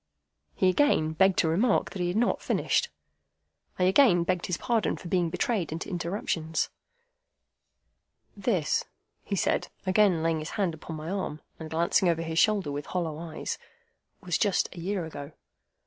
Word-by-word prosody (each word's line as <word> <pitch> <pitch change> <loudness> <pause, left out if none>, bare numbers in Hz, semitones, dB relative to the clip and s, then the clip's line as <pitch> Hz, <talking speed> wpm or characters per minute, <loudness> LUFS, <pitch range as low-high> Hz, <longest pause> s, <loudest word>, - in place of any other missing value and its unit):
He 190 - +2
again 185 - +3
begged 190 +3 +3
to - - +3
remark 195 +10 +2
that 190 - -5
he 175 - +1
had 175 +4 -1
not 240 - +1
finished. 480 - +1 0.9
I 180 - +1
again 185 -2 +5
begged 180 0 -1
his 180 - -1
pardon 230 -3 0
for 175 - -9
being 175 -2 +1
betrayed 180 0 -1
into 165 +5 -5
interruptions. 170 -3 -2 1.6
"This," 470 -1 0 0.4
he 200 - -2
said, - - +1 0.2
again 185 -3 +3
laying 165 -1 +1
his 155 - -5
hand 190 -5 +1
upon 160 +1 -8
my 155 +3 -5
arm, 190 -6 -3 0.2
and 160 -1 -7
glancing 170 +3 +2
over 165 -1 0
his 165 0 -1
shoulder 205 -8 +3
with 145 0 -5
hollow 165 -4 -2
eyes, 165 -1 -5 0.6
"was 180 -4 -1
just 200 -3 +1
a - - -8
year 185 0 -2
ago. 145 -1 -8
175 Hz, 165 wpm, -28 LUFS, 160-195 Hz, 1.6 s, again